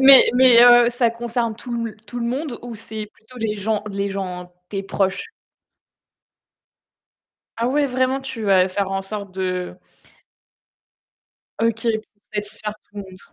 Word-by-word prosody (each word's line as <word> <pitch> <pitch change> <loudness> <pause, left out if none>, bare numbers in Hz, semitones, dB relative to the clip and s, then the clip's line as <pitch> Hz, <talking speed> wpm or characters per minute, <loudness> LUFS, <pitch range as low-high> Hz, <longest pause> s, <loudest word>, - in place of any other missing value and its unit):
Mais 270 0 +9
mais 250 -2 +7
heu, 240 0 +7
ça 240 -1 +1
concerne 235 -1 -2
tout 235 -1 -4
l 215 - -12
tout 245 +3 -6
le 235 - -1
monde 260 +1 -3
ou 240 -1 -7
c'est 215 0 -7
plutôt 250 +4 -18
les 215 -1 -2
gens 210 +1 -1
les 200 0 -2
gens 180 -2 -5 0.2
tes 195 -1 -3
proches? 195 - -1 2.3
Ah, 235 +1 0
ouais, 290 +3 +2
vraiment, 260 +1 0
tu 265 -4 -6
vas 190 -2 +4
faire 195 +1 -2
en 195 0 -2
sorte 200 -1 -7
de 185 -1 -3 1.8
OK, 230 0 0 0.5
satisfaire 210 0 -4
tout 205 - -23
le - - -4
monde. 190 -1 -13
220 Hz, 150 wpm, -21 LUFS, 195-240 Hz, 2.3 s, Mais